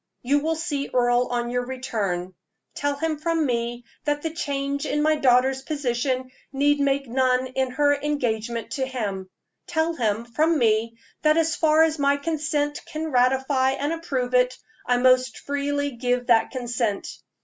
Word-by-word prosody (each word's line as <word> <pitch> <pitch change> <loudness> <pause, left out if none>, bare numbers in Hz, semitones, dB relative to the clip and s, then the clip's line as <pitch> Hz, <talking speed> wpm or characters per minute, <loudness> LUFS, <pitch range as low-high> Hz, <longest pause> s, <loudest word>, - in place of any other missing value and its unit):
You 280 +4 +3
will 320 +2 -1
see 300 -4 -3
Earle 245 0 +2
on 240 -1 -2
your 245 0 0
return; 210 -8 -3 0.4
tell 285 0 -1
him 310 +1 -2
from 325 0 0
me 240 -1 -2 0.2
that 295 0 -1
the 320 -1 -3
change 280 -3 -2
in 295 - 0
my 310 0 +3
daughter's 265 -1 +3
position 260 -3 -2 0.2
need 290 +1 +2
make 275 -1 +1
none 255 +1 +2
in 260 0 -1
her 285 +3 +2
engagement 240 -6 -2
to 265 -2 -1
him; 200 -7 -4 0.4
tell 325 0 0
him, 225 -5 -1
from 310 +7 +1
me, 230 -2 +1 0.2
that 305 +1 +4
as 325 0 +2
far 315 0 +4
as 320 -1 0
my 280 0 +3
consent 295 -1 -1
can 315 0 -4
ratify 265 +1 +2
and 290 +4 -2
approve 265 -7 -3
it, 250 0 +3 0.3
I 245 0 +3
most 255 -1 +3
freely 285 0 -2
give 245 0 -1
that 230 -2 +4
consent. 240 -5 -2
265 Hz, 160 wpm, -24 LUFS, 245-295 Hz, 0.4 s, that